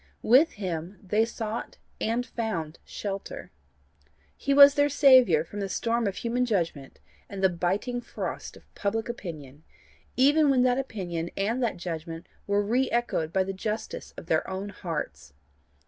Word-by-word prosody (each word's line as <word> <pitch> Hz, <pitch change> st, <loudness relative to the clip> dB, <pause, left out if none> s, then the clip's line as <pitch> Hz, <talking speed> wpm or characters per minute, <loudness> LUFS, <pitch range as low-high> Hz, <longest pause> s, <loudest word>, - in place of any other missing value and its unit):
With 265 Hz, +8 st, +5 dB
him 180 Hz, -2 st, -5 dB
they 210 Hz, +4 st, +2 dB
sought 225 Hz, 0 st, -5 dB, 0.2 s
and 235 Hz, +3 st, 0 dB
found 180 Hz, -11 st, -4 dB
shelter. 200 Hz, -1 st, -6 dB, 0.8 s
He 280 Hz, -, -2 dB
was 280 Hz, 0 st, +9 dB
their 290 Hz, 0 st, +3 dB
saviour 255 Hz, -, +6 dB
from 205 Hz, +5 st, -8 dB
the 195 Hz, -1 st, -3 dB
storm 230 Hz, +2 st, 0 dB
of 195 Hz, -, -2 dB
human 240 Hz, +1 st, -1 dB
judgment 170 Hz, -, -2 dB, 0.3 s
and 195 Hz, -1 st, -6 dB
the 190 Hz, -, +6 dB
biting 195 Hz, +8 st, -1 dB
frost -, -, -6 dB
of -, -, -18 dB
public 220 Hz, +2 st, -2 dB
opinion, 155 Hz, -, -7 dB, 0.5 s
even 290 Hz, +3 st, +5 dB
when 260 Hz, -2 st, +4 dB
that 250 Hz, +1 st, +3 dB
opinion 175 Hz, -10 st, -4 dB
and 225 Hz, +6 st, 0 dB
that 230 Hz, -6 st, 0 dB
judgment 165 Hz, -1 st, -6 dB, 0.2 s
were 205 Hz, 0 st, +2 dB
re 250 Hz, +5 st, +1 dB
echoed 235 Hz, -9 st, -1 dB
by 190 Hz, +2 st, +2 dB
the 195 Hz, +1 st, -4 dB
justice 215 Hz, +3 st, -4 dB
of -, -, -8 dB
their -, -, 0 dB
own 190 Hz, +2 st, -4 dB
hearts. 75 Hz, -, -5 dB
205 Hz, 155 wpm, -27 LUFS, 175-240 Hz, 0.8 s, was